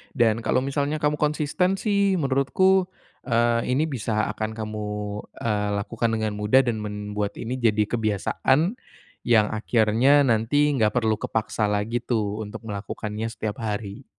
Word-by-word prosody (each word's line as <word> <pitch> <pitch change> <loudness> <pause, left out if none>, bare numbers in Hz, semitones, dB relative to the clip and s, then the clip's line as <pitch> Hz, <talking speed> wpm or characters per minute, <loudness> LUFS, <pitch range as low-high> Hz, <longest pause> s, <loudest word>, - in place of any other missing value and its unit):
dan 115 -3 +3
kalau 125 +2 +1
misalnya 140 +2 -1
kamu 150 -1 0
konsisten 150 +5 +1
sih, 200 -1 +1
menurutku, 180 +6 +2 0.4
eee, 115 -1 +2
ini 145 - +2
bisa 115 -7 -1
akan 110 0 -4
kamu, 110 -1 -5 0.5
eee, 105 -2 -1
lakukan 115 +3 -1
dengan 110 -1 -1
mudah 110 +6 +4
dan 120 -3 -1
membuat 105 -1 -4
ini 125 +3 -4
jadi 110 -3 +3
kebiasaan, 120 - 0 0.4
yang 110 -3 +3
akhirnya 115 +6 +3
nanti 130 +5 +2
enggak 110 -5 +1
perlu 110 -2 +2
kepaksa 110 -1 -1
lagi 105 +4 -1
tuh, 110 -3 -1
untuk 105 +2 -8
melakukannya 105 +1 -4
setiap 110 -2 -5
hari. 105 +2 -4
115 Hz, 140 wpm, -24 LUFS, 105-140 Hz, 0.5 s, mudah